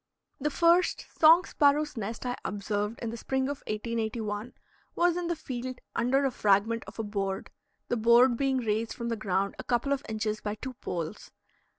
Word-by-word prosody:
The 295 +2 0
first 340 +4 +3
song 330 +3 +8
sparrow's 295 +1 +2
nest 225 +2 -5
I 245 0 -1
observed 205 +2 -2
in 225 - -2
the 235 - -6
spring 265 +3 -1
of 280 +1 -2
1881 220 0 -3 0.4
was 345 0 +3
in 350 -1 -2
the 345 - 0
field 255 -4 -5 0.2
under 265 +4 +2
a 270 - +1
fragment 215 +2 +2
of - - -11
a 225 - -2
board, 195 -2 -3 0.4
the 240 - 0
board 235 +2 +5
being 270 +1 +1
raised 225 -2 -1
from 235 -1 -4
the 230 - 0
ground 200 -2 -1
a - - -5
couple 245 +4 +1
of 280 0 -3
inches 215 0 -2
by 210 0 -3
two 260 +4 -6
poles. 175 -5 -5
235 Hz, 185 wpm, -29 LUFS, 215-270 Hz, 0.4 s, song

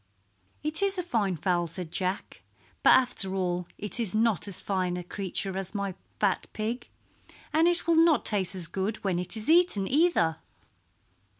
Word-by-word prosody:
"It 305 +3 +1
is 395 -1 +1
a 360 - -2
fine 215 - -1
fowl," 175 +1 0
said 165 0 -8
Jack. 185 +2 -3 0.4
"But - - +6
after 195 -7 +3
all 180 -2 -2
it 210 +3 -5
is 215 -4 -2
not 220 -3 +1
as 195 - -4
fine 185 -2 -2
a 180 - -5
creature 190 +1 -3
as 195 +2 -5
my 200 -1 -2 0.3
fat 200 -3 0
pig, 230 +3 -4 0.7
and 320 +2 +4
it 350 0 +5
will 335 -1 +2
not 320 -6 +2
taste 195 -3 -1
as 180 -2 +3
good 195 +5 -1
when 185 -3 0
it 180 +5 0
is 215 - -2
eaten, 325 - +4
either." 275 - +2
200 Hz, 175 wpm, -27 LUFS, 185-245 Hz, 0.7 s, But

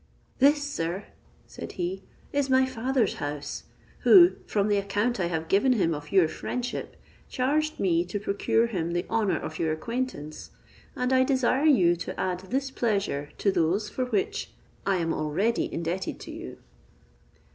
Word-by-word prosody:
"This, 285 +2 +5
sir," 185 -9 -3 0.4
said - - -9
he, 185 +2 -3 0.3
"is 285 -1 +1
my 260 0 +5
father's 255 -2 0
house; 145 0 -5 0.3
who, 360 -2 +8 0.2
from 205 -1 +1
the 205 -1 +2
account 205 +4 0
I 175 - +1
have 165 -1 -3
given 205 +9 +4
him 175 -8 +1
of 145 0 -7
your 190 -4 +5
friendship, 250 +9 -4 0.3
charged 305 +4 0
me 170 -3 +2
to 205 +3 -4
procure 205 +3 +1
him 175 -7 -2
the 175 +1 -1
honour 210 -7 +1
of 155 - -6
your 160 -1 +1
acquaintance; 155 - -4 0.5
and 250 +1 0
I 260 0 +5
desire 265 +1 +2
you 185 - +5
to 175 - -6
add 180 -1 -1
this 270 +2 -1
pleasure 200 - -1
to 200 - +2
those 190 +5 +1
for 255 - -2
which 410 - -1 0.4
I 195 - +3
am 165 -2 0
already 185 +10 0
indebted 170 +3 -3
to - - -8
you." - - -8
205 Hz, 160 wpm, -27 LUFS, 170-260 Hz, 0.5 s, who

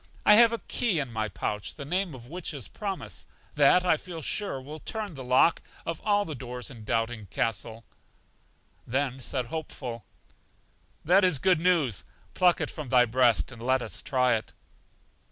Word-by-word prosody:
I 210 - +8
have 230 +2 +7
a 230 - -1
key 230 -5 0
in 135 -5 -4
my 110 -1 -1
pouch, 105 -1 -3
the 140 - -7
name 180 0 -1
of 120 -2 -12
which 165 +3 -5
is 130 -6 -5
Promise, 200 -3 -5 0.3
that, 150 +5 +5
I 170 -3 +4
feel 165 -1 -8
sure, 200 -7 -1
will 150 +4 -9
turn 215 -1 -5
the 135 -3 -8
lock 130 +6 +4 0.2
of 165 -1 -4
all 205 -1 +2
the 160 - -5
doors 125 0 -7
in 115 -4 -11
Doubting 115 -1 -2
Castle. 115 +3 -2 1.0
Then 135 +1 -1
said 130 0 -2
Hopeful: 125 -5 -6 1.0
That 185 +5 +5
is 180 -6 +5
good 180 +3 +3
news; 160 - +2 0.3
pluck 180 -1 +3
it - - -2
from 150 -5 -7
thy 125 -1 +5
breast, 120 -6 +2
and 115 -2 -11
let 130 +1 +1
us - - -5
try 125 -2 +2
it. 110 - -3
135 Hz, 175 wpm, -27 LUFS, 120-180 Hz, 1.0 s, I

